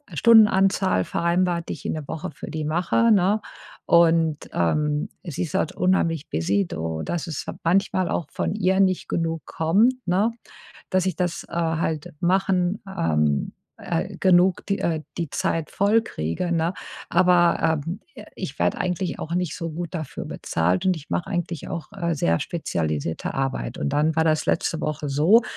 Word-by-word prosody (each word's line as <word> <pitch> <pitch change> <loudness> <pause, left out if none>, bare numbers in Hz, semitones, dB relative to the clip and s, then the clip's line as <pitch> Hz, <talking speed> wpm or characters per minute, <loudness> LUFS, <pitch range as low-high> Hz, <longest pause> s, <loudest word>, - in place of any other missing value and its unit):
Stundenanzahl 195 - +5
vereinbart, 170 0 0
die - - -1
ich - - -11
in - - -1
der 155 -3 -6
Woche 165 +4 -5
für - - -9
die 155 -1 -3
mache, 180 +9 +2
ne? 205 +1 +4 0.5
Und, 165 -3 +3
ähm, 150 - 0
sie 170 -2 -3
ist 160 - -6
halt - - 0
unheimlich 165 -4 +1
busy, 95 +5 +1
do 80 0 -4
dass 175 0 -3
es 155 -3 -4 0.2
manchmal 185 +1 +2
auch 170 - -1
von - - -2
ihr 190 -2 +2
nicht 185 -2 +2
genug 165 -1 -2
kommt, 195 +10 +3
ne? 195 +6 +2 0.6
Dass 185 -1 +2
ich 185 - -1
das, 175 -1 -2
äh, - - -14
halt 160 -2 -1
machen, 185 +1 +1
ähm, 75 - 0 0.2
äh 175 +3 -3
genug 185 -1 +4
die, 200 -1 0
äh 160 -2 -1 0.2
die 165 -4 -2
Zeit 160 +1 -1
voll 205 +3 +3
kriege, 85 - -3
ne? 165 +2 0 0.4
Aber, 175 -3 +3
ähm, 170 +5 -4 0.2
äh, - - -10
ich - - -6
werde - - +1
eigentlich 180 0 -2
auch 165 - -4
nicht 180 -2 -1
so 165 -1 -4
gut 170 +2 -5
dafür 155 -5 -5
bezahlt. 90 - -1
Und 185 - +4
ich 155 0 -11
mache - - -1
eigentlich 175 -3 -3
auch, 165 - -5
äh, 170 -1 -1
sehr 85 - +1
spezialisierte 80 - -2
Arbeit. 135 - -2
Und 70 - -1
dann 155 +2 +2
war 160 - +4
das 155 -1 +1
letzte 165 -1 0
Woche 150 -1 -3
so, 160 - +5
170 Hz, 170 wpm, -24 LUFS, 150-185 Hz, 0.6 s, Stundenanzahl